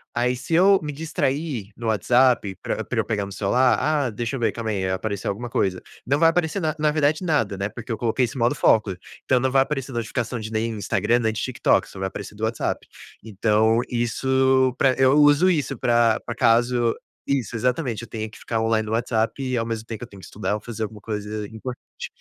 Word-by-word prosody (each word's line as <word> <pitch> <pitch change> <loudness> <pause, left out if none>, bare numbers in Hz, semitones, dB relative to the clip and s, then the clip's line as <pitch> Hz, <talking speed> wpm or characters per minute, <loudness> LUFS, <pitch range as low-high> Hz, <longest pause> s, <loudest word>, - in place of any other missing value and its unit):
Aí 125 +1 +1
se 135 +6 -2
eu 195 +3 +6
me 150 -2 -4
distrair 140 -6 -2
no 115 - -5
WhatsApp 115 -1 +3
pra - - -2
pra - - -3
eu - - +1
pegar 105 -2 -1
meu 100 - -9
celular: 110 +4 +2
"Ah, 150 -4 +1
deixa 115 +3 -3
eu - - -6
ver, 115 - +1
calma 115 -2 -4
aí, 95 -2 -1
apareceu 100 +2 -2
alguma 120 +5 -4
coisa". 95 -5 0 0.3
Não 140 +3 +2
vai 165 +2 +5
aparecer 170 +2 0
na 155 -4 -1
na 150 0 +3
verdade 155 +2 +1
nada, 145 - +1
né, 100 +1 -1
porque 120 +2 -8
eu 115 - -1
coloquei 120 +3 +1
esse 120 - -7
modo 120 0 +2
foco, 105 -4 +3 0.3
então, 130 - +2
não 130 +1 0
vai 135 0 +5
aparecer 135 -1 -2
notificação 120 0 -3
de 110 0 -6
nenhum 110 0 -1
Instagram, 115 +4 +1
nem 110 -2 +1
de 110 - -4
TikTok, 125 -1 +1
só 95 - -11
vai 95 - -1
aparecer 100 +1 -8
do 110 - -8
WhatsApp. 115 +1 -2 0.4
Então, 110 +2 +2
isso 130 +2 +2
pra 135 -1 +4
eu 130 -1 +5
uso 145 +4 +5
isso 145 -5 -1
pra 120 -1 +3
pra 120 - -3
caso 120 0 +3 0.3
Isso, 130 -5 -1
exatamente, 125 -1 -1
eu - - -9
tenha 110 -1 -4
que 110 - -14
ficar 115 -1 -2
online 110 -1 +1
no 110 - -4
WhatsApp 115 +3 0
e 130 -1 -1
ao 115 - 0
mesmo 115 -1 -4
tempo 115 0 -7
eu - - -7
tenho 100 -2 -14
que - - -11
estudar 105 0 -3
ou 105 - -6
fazer 115 -2 -5
alguma 105 -1 -6
coisa 105 0 -4
importante. 120 +4 -8
120 Hz, 225 wpm, -23 LUFS, 110-130 Hz, 0.4 s, eu